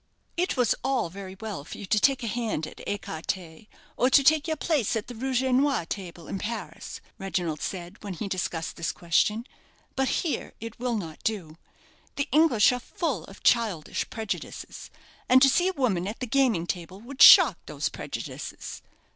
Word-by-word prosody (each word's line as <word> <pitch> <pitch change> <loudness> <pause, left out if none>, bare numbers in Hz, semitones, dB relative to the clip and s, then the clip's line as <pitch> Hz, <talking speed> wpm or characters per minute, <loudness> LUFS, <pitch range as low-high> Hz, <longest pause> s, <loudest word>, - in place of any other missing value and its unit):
"It 360 -3 0
was 245 -4 +3
all 255 -9 0
very 190 0 -9
well 210 -9 -5
for - - -9
you - - -7
to 210 +2 +2
take 270 +2 +3
a - - -2
hand 225 -8 -2
at - - -11
écarté, 175 -1 -4 0.3
or 250 - +3
to 275 +1 +6
take 305 +2 +4
your 315 -1 -1
place 285 -9 0
at 220 - -2
the 245 - -8
rouge 260 +2 -1
et 260 - 0
noir 265 - +2
table, 175 -3 -7
in 195 - -4
Paris," 230 +4 -6 0.2
Reginald 175 -5 -2
said, 180 +2 -6
when 200 -3 -5
he 200 - -4
discussed 175 -3 -3
this 165 - -1
question; 210 +7 +1 0.5
"but 265 0 +1 0.2
here 315 - -2
it 230 0 -8
will 245 -1 -1
not 165 -6 -7
do. 180 -8 -2 0.6
The 280 +1 -1
English 300 -10 +5
are 250 - -2
full 250 - -3
of 195 - -14
childish 215 -10 +1
prejudices, 220 -2 -6 0.4
and 255 +1 +8
to 270 - +7
see 350 +7 +3
a 380 - 0
woman 215 - 0
at 215 - -5
the 255 - -2
gaming 240 -8 +2
table 180 +1 -5
would 260 +4 -7
shock - - +9
these - - -2
prejudices. - - -7
220 Hz, 185 wpm, -27 LUFS, 185-260 Hz, 0.6 s, shock